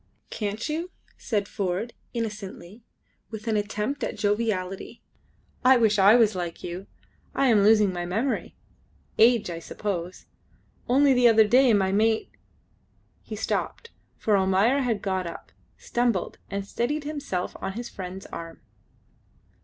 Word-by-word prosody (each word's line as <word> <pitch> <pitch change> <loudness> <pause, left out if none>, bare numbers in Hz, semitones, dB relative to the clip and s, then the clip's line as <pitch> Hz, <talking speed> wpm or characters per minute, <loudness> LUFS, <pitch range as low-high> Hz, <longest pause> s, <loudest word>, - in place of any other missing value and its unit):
"Can't 210 +3 -3
you?" 325 +4 -3 0.3
said 205 -4 -2
Ford, 200 +3 -3 0.2
innocently, 210 -3 -6 0.5
with 220 0 -8
an 220 - +1
attempt 210 +6 -2
at - - -3
joviality: 205 -3 -2 0.6
"I 260 +1 +7
wish 220 -3 +3
I 200 +3 +7
was 225 -3 +4
like 175 -2 -5
you. 180 +3 -6 0.5
I 275 - +3
am 215 -3 +5
losing 210 -2 +5
my 175 0 -4
memory 225 +9 -2 0.6
age, 230 -4 +5
I 165 - -5
suppose; 180 0 -5 0.6
only 275 +2 +5
the 250 -1 +5
other 220 -2 +6
day 255 +3 +5
my 190 -2 +2
mate 220 +2 +1 0.5
" - - -40
He - - -7
stopped, 465 - -3 0.3
for 215 - +2
Almayer 195 +7 +3
had 235 -6 -1
got 190 -3 -1
up, 170 - -9 0.3
stumbled, 240 -6 -1
and 200 0 -3
steadied 290 +9 -2
himself 285 -12 -4
on 190 - -3
his 240 +3 -5
friend's 185 0 -8
arm. 165 0 -8
210 Hz, 140 wpm, -26 LUFS, 190-240 Hz, 0.6 s, I